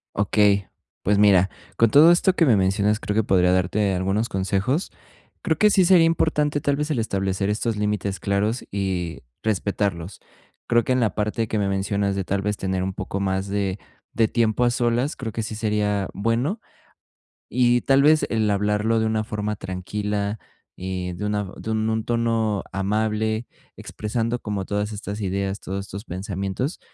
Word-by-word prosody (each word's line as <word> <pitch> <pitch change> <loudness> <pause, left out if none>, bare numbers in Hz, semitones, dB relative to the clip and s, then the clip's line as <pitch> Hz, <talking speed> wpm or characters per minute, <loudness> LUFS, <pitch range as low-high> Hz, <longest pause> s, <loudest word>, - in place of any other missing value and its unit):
Okey, 100 -1 +3 0.4
pues, 100 +1 +2
mira, 100 -2 +5 0.3
con 115 -2 +4
todo 155 +4 +8
esto 180 +2 +3
que 165 - +4
me 120 - +5
mencionas, 100 +3 +1
creo 105 - -3
que 110 - +3
podría 90 -2 +3
darte 95 +2 +1
algunos 95 +5 0
consejos. 100 - -1 0.5
Creo 160 - +1
que 210 - +6
sí 190 -3 +4
sería 175 -2 +6
importante, 150 -3 +1
tal 145 0 +1
vez, 150 +2 -2
el 150 - 0
establecer 100 -2 -1
estos 110 +1 -1
límites 105 -1 -1
claros 105 +4 -1
y 95 -4 -2 0.2
respetarlos. 100 -3 -2 0.5
Creo 120 0 +3
que 130 - 0
en 130 - +2
la 115 -3 +1
parte 105 +1 -1
que 110 - -1
me 100 - +1
mencionas 100 0 0
de, 100 - -1
tal 100 +2 -1
vez, 105 +1 -2
tener 95 -1 -2
un 95 0 -2
poco 95 +1 -4
más 95 0 -1
de 100 -1 -2 0.3
de 115 0 +2
tiempo 115 +1 +1
a 120 - +3
solas, 120 +4 0
creo 115 -4 -5
que 115 - -3
sí 110 - -5
sería 105 -2 0
bueno. 115 - 0 0.9
Y, 120 0 +3
tal 135 0 +4
vez, 155 +2 +4
el 110 -2 +1
hablarlo 105 +2 +1
de 110 - +1
una 110 0 0
forma 105 -1 -3
tranquila, 105 +3 -3 0.4
eh, 90 -1 -4
de 105 - -5
una 105 0 -1
de 110 - -6
un 110 0 0
un 110 0 -1
tono 115 -3 0
amable, 110 +3 -1 0.3
expresando 115 +2 -3
como 105 -3 -3
todas 105 +1 -2
estas 100 0 -6
ideas, 100 0 -2
todos 95 +1 -5
estos 100 +1 -8
pensamientos, 100 - -4
105 Hz, 175 wpm, -23 LUFS, 100-115 Hz, 0.9 s, todo